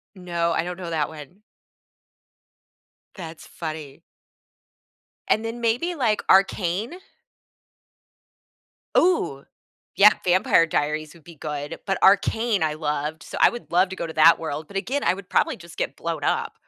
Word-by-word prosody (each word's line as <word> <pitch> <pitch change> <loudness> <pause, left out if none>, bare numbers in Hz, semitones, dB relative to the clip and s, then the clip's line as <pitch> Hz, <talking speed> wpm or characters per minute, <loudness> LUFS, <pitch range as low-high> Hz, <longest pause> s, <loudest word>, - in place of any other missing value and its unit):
No, 170 -2 -2
I - - 0
don't 180 +1 -6
know 175 -2 -6
that 155 -2 -1
one. 160 +6 -12 1.7
That's 165 -4 -9
funny. 155 -3 -7 1.3
And 220 - +2
then 230 +1 -5
maybe 240 +10 0
like 230 -8 0
Arcane? 195 - +2 2.0
Ooh, 175 - +2 0.5
yeah, 210 +1 +8
Vampire 180 -2 +4
Diaries 155 0 -2
would 165 -3 -19
be 170 - -13
good, 145 0 -6
but 195 -1 0
Arcane 205 +1 +3
I 155 -1 0
loved, 150 0 -3
so - - -8
I - - +7
would 240 - -9
love 180 +2 +4
to 190 - -7
go - - -4
to 160 - -7
that 160 +1 +6
world 155 -1 -5
but 195 - -10
again, 260 +9 -2
I - - +3
would 195 -1 -11
probably - - +1
just 170 -2 -14
get - - -3
blown - - -4
up. - - -1
170 Hz, 150 wpm, -23 LUFS, 155-200 Hz, 2.0 s, yeah